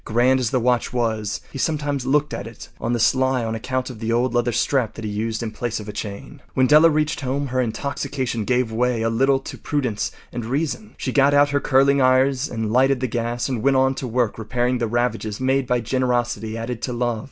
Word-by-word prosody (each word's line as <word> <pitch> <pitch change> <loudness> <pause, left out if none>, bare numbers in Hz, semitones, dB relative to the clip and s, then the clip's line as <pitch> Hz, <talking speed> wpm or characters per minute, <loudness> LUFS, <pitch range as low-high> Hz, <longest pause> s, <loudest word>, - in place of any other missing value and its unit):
Grand 125 +4 +2
as 125 -3 0
the 130 - +1
watch 125 0 +1
was, 110 -4 -1
he 135 - -7
sometimes 145 -4 -1
looked 150 +2 +1
at 100 - -5
it 115 - -11
on 115 - -2
the 120 - 0
sly 130 0 +2
on 110 - -2
account 130 +3 -3
of 115 - -11
the 115 0 -2
old 120 +1 +1
leather 120 0 +1
strap 120 0 0
that 115 - -6
he 105 - -3
used 110 +2 -2
in 110 - -3
place 115 +1 -3
of 105 - -9
a - - -4
chain. 100 -2 -7
When 130 - +4
Della 150 +4 +7
reached 155 -1 0
home 140 +2 -1
her 130 +1 +1
intoxication 125 -1 -3
gave 125 0 0
way 120 0 0
a 115 - +1
little 135 +4 +3
to - - -9
prudence 130 -8 -2 0.2
and 120 -1 -4
reason. 150 - -3
She 130 - -3
got 140 +1 +4
out 145 0 +5
her 145 0 +1
curling 140 0 +3
irons 130 +2 +3
and 110 -2 -3
lighted 135 +1 +3
the 130 - -1
gas 120 0 -2
and 125 -5 -2
went 135 +1 +3
to 130 - -4
work 120 -2 0
repairing 120 +3 -1
the 115 - 0
ravages 115 -2 -1
made 130 0 +1
by 125 0 +1
generosity 120 -2 -1
added 115 0 -4
to 125 - -3
love. 120 -2 -1
125 Hz, 225 wpm, -22 LUFS, 115-135 Hz, 0.2 s, Della